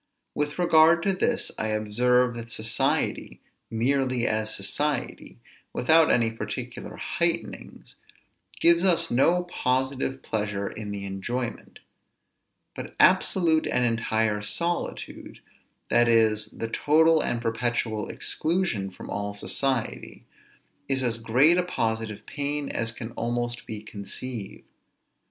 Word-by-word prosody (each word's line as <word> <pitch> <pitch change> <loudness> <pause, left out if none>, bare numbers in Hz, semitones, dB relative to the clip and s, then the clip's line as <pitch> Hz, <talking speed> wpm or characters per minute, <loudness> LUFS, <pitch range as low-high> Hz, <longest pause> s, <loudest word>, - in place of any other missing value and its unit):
With 150 0 -2
regard 170 -1 +5
to 195 - +2
this, 235 +6 0
I 110 - -1
observe, 120 +4 +2
that 115 0 -8
society, 115 +1 -1 0.3
merely 125 +1 0
as 110 0 0
society, 140 +7 -2 0.4
without 160 +5 +4
any 115 -2 +2
particular 115 - -6
heightenings, - - -3 0.6
gives 170 +1 +5
us 170 -3 +3
no 170 +8 +3
positive 130 -4 -1
pleasure 105 -2 -2
in 105 -1 -6
the 100 -1 -4
enjoyment; 115 +5 -4 1.0
but - - -8
absolute 165 -4 +4
and 125 0 +1
entire 110 -2 0
solitude, 170 +12 -4 0.5
that 120 0 +4
is, 110 -2 +3
the 115 - -5
total 160 +6 +3
and 120 - -1
perpetual 115 -2 -1
exclusion 155 - -1
from 95 - -11
all 100 0 -4
society, 130 +3 -2 0.6
is 135 -1 +1
as 115 -2 0
great 135 +10 +4
a - - +2
positive 110 - -3
pain 145 0 -3
as 115 0 -1
can 115 0 -7
almost 120 +1 -3
be 105 -1 -6
conceived. 105 +1 -7
120 Hz, 115 wpm, -26 LUFS, 110-145 Hz, 1.0 s, regard